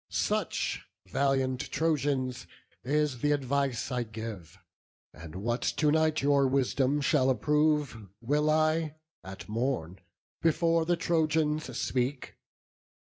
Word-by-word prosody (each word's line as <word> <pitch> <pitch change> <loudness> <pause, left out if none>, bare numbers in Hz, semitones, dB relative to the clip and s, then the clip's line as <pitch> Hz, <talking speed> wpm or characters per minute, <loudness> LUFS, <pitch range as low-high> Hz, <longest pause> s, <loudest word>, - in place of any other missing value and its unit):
Such, - - -1 0.2
valiant 130 +4 0
Trojans, 140 -5 -1 0.4
is 150 0 0
th' - - -2
advice 140 -3 0
I 125 -1 0
give; 110 -6 -7 0.6
And 80 0 -11
what 120 +5 -2
to 150 -2 +1
night 155 -1 +2
your 140 -1 +4
wisdom 135 +1 +1
shall 140 -3 +3
approve 150 -2 +1
Will 150 +5 +1
I, 155 0 +1 0.3
at 95 0 -9
morn, 110 -6 -2 0.4
before 165 0 +2
the 175 +1 +1
Trojans 155 -2 0
speak. 130 +1 -2
140 Hz, 110 wpm, -29 LUFS, 125-155 Hz, 0.6 s, your